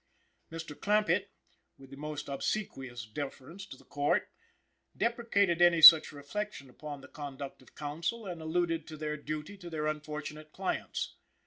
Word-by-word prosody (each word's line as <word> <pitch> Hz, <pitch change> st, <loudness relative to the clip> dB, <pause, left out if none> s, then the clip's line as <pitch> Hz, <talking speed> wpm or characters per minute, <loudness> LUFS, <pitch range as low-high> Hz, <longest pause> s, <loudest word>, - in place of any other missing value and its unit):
Mr. 165 Hz, -2 st, -6 dB
Clampitt, 205 Hz, -1 st, +2 dB, 0.5 s
with 135 Hz, -1 st, -15 dB
the -, -, -8 dB
most 150 Hz, +1 st, -5 dB
obsequious 135 Hz, -, -3 dB
deference 140 Hz, -, -7 dB
to 130 Hz, -, -10 dB
the -, -, -18 dB
Court, 145 Hz, 0 st, +1 dB, 0.7 s
deprecated 200 Hz, -7 st, +2 dB
any 175 Hz, -1 st, +6 dB
such 160 Hz, 0 st, +11 dB
reflection 145 Hz, 0 st, -5 dB
upon 145 Hz, +1 st, -8 dB
the -, -, -12 dB
conduct 140 Hz, -2 st, -7 dB
of 130 Hz, -, -20 dB
counsel 165 Hz, +10 st, -3 dB
and 175 Hz, -4 st, -6 dB
alluded 165 Hz, 0 st, 0 dB
to 155 Hz, -, -8 dB
their 150 Hz, 0 st, -2 dB
duty 155 Hz, +6 st, -6 dB
to 175 Hz, -2 st, -8 dB
their 155 Hz, -2 st, -3 dB
unfortunate 155 Hz, 0 st, -4 dB
clients. 190 Hz, -1 st, -3 dB
155 Hz, 145 wpm, -31 LUFS, 145-175 Hz, 0.7 s, such